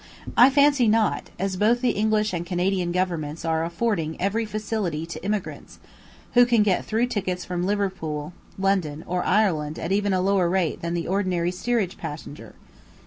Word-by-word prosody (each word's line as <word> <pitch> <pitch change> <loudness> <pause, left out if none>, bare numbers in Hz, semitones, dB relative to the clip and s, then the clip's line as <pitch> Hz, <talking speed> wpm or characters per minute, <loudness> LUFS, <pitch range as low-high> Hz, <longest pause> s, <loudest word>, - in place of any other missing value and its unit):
I 250 - +8
fancy 280 -3 +4
not, 215 0 +1
as 190 0 -2
both 230 +5 +3
the 250 -2 +2
English 215 -1 +1
and 170 -1 -2
Canadian 180 0 -1
Governments 170 -4 -2
are 160 0 +1
affording 170 -2 -1
every 210 +4 0
facility 210 -7 -3
to 170 - -8
emigrants, 205 -1 -4 0.6
who 245 -1 +7
can 235 -3 +4
get 195 -3 +1
through 225 +2 0
tickets 185 -6 -3
from 180 -1 -3
London, 180 -6 -2 0.2
Liverpool, 185 -6 0
or 180 0 -1
Ireland 165 -7 +1
at - - -4
even 205 0 +1
a 185 - +2
lower 190 -2 +2
rate 180 -3 0
than 170 +1 -2
the 170 - -3
ordinary 180 -2 0
steerage 195 0 -1
passenger. 150 - -8
190 Hz, 165 wpm, -24 LUFS, 170-215 Hz, 0.6 s, I